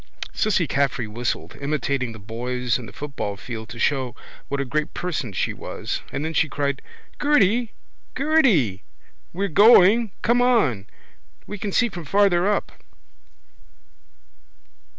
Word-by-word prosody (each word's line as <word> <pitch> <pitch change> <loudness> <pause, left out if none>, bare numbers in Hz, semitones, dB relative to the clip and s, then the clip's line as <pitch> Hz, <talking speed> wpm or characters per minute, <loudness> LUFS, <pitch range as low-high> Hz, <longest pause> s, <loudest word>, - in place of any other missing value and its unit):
Cissy 195 -5 +1
Caffrey 135 -4 0
whistled, 120 +3 -4
imitating 140 -3 -1
the 110 - -10
boys 120 +4 -2
in 120 - -8
the - - -11
football 140 -9 -5
field 110 0 -7
to 115 - -9
show 130 0 0 0.3
what 140 - -3
a 140 - -1
great 150 +5 -2
person 160 - -3
she 95 - -1
was: - - -5
and 140 +3 -3
then 160 - -3
she 155 -1 +2
cried: 140 -1 -2 0.4
—Gerty! 240 -5 +3 0.4
Gerty! 220 - +3 0.5
We're 195 +3 -2
going. 210 +4 +6
Come 240 +1 +3
on. 150 - +2 0.6
We 205 - -7
can 200 0 -3
see 240 - +3
from 175 -6 -8
farther 195 +1 +3
up. 205 - -1
150 Hz, 135 wpm, -23 LUFS, 125-205 Hz, 0.6 s, going